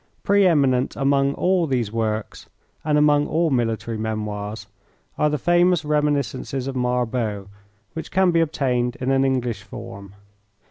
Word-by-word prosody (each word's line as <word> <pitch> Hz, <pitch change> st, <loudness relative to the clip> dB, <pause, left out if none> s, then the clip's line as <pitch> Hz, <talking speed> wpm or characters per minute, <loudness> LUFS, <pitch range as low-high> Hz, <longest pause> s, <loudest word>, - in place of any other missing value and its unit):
Pre 200 Hz, -1 st, +4 dB
eminent 135 Hz, -6 st, +2 dB
among 140 Hz, 0 st, +1 dB
all 180 Hz, -2 st, +1 dB
these 120 Hz, -6 st, -1 dB
works, 110 Hz, -1 st, -3 dB, 0.3 s
and 150 Hz, -1 st, +1 dB
among 150 Hz, 0 st, +3 dB
all 165 Hz, 0 st, +1 dB
military 115 Hz, -2 st, -1 dB
memoirs, 105 Hz, -1 st, -4 dB, 0.5 s
are 150 Hz, -, +2 dB
the 150 Hz, -, -1 dB
famous 175 Hz, +2 st, +2 dB
reminiscences 145 Hz, -3 st, -1 dB
of 135 Hz, -1 st, -4 dB
Marbot, 125 Hz, -4 st, -1 dB, 0.5 s
which 160 Hz, -1 st, -6 dB
can 190 Hz, -1 st, +3 dB
be 165 Hz, -1 st, +3 dB
obtained 125 Hz, -6 st, 0 dB
in 130 Hz, +1 st, -2 dB
an 135 Hz, 0 st, +3 dB
English 125 Hz, -4 st, -1 dB
form. 100 Hz, 0 st, -10 dB
135 Hz, 140 wpm, -22 LUFS, 115-150 Hz, 0.5 s, Pre